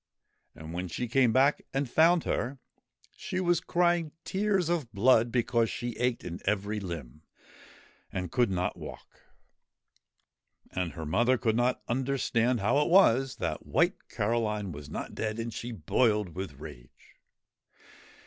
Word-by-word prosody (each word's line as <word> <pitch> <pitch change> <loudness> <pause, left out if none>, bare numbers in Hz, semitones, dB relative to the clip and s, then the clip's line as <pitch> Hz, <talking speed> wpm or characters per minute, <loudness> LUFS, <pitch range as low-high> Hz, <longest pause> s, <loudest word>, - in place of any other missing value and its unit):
And, 80 +1 -9
when 90 +1 -3
she 120 +8 -3
came 125 0 +3
back 135 +5 +3
and 135 0 0
found 165 +6 +4
her, 130 +3 -2 0.6
she 185 - -4
was 175 -2 +2
crying 175 -3 +1
tears 195 -3 +1
of 165 -9 -1
blood 115 +2 +4
because 120 -2 +1
she 120 -1 -4
ached 125 0 0
in 85 0 -6
every 105 +1 -1
limb 80 -7 -7 0.9
and 90 -2 -4
could 120 -3 +2
not 90 -1 -1
walk - - -9 1.6
And 90 -2 -3
her 80 -2 -6
mother 120 +11 +2
could 110 -2 0
not 120 +1 +1
understand 125 -2 0
how 120 +8 +3
it 150 - +1
was 135 -8 +5
that - - -4
White - - +1
Caroline 105 -2 -1
was 75 -1 -9
not - - -5
dead, 110 0 -3
and 115 0 -4
she 120 +3 -5
boiled 105 +1 +1
with 90 -2 -6
rage. 65 -4 -13
115 Hz, 145 wpm, -29 LUFS, 95-135 Hz, 1.6 s, was